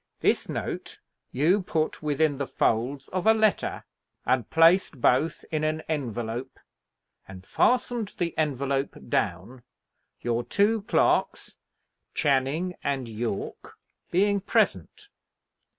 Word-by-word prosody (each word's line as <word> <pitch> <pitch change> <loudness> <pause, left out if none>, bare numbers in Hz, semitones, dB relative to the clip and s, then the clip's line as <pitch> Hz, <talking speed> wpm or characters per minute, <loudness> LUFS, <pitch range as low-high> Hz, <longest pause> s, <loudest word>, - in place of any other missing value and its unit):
This - - +1
note - - -5 0.3
you 165 +10 +2
put 160 -3 -2
within 150 -1 +1
the 140 - -2
folds 130 +6 0
of 185 +2 -2
a 220 - +7
letter, 215 -2 +1 0.4
and 125 -3 +1
placed 165 -3 +4
both 130 +7 +2
in 155 -1 -1
an 155 +1 0
envelope, 120 -4 -4 0.7
and 95 0 -11
fastened 240 - +1
the 170 -2 -2
envelope 140 -2 -1
down, 100 +6 -2 0.6
your 120 0 -1
two 210 - +2
clerks, 200 - +1 0.6
Channing 145 +5 +1
and 135 -3 -1
Yorke, 110 -2 -5 0.3
being 200 +3 +2
present. 410 - 0
145 Hz, 110 wpm, -26 LUFS, 125-180 Hz, 0.7 s, a